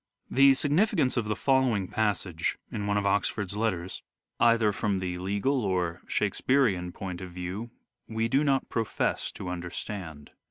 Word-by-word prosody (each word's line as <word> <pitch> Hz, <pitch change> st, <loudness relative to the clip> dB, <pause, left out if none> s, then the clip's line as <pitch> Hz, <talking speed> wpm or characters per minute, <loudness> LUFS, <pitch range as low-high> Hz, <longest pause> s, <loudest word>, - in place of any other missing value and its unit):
The 135 Hz, 0 st, +6 dB
significance 145 Hz, -1 st, +2 dB
of 120 Hz, -, 0 dB
the 105 Hz, -, 0 dB
following 125 Hz, -7 st, +2 dB
passage 100 Hz, -6 st, -1 dB
(in 105 Hz, -1 st, -3 dB
one 105 Hz, 0 st, +1 dB
of 100 Hz, -, 0 dB
Oxford's 100 Hz, 0 st, 0 dB
letters) 95 Hz, -5 st, -2 dB, 0.4 s
either 115 Hz, -2 st, +4 dB
from 100 Hz, -1 st, 0 dB
the 90 Hz, -1 st, -3 dB
legal 100 Hz, +9 st, 0 dB
or 90 Hz, -3 st, -1 dB
Shakespearean 110 Hz, -10 st, +1 dB
point 90 Hz, -1 st, -6 dB
of 95 Hz, -, -6 dB
view 90 Hz, +6 st, -5 dB, 0.4 s
we 110 Hz, 0 st, -1 dB
do 135 Hz, +5 st, +2 dB
not 135 Hz, -2 st, +1 dB
profess 115 Hz, -2 st, -1 dB
to -, -, -7 dB
understand. 90 Hz, -3 st, -5 dB
105 Hz, 150 wpm, -28 LUFS, 90-120 Hz, 0.4 s, The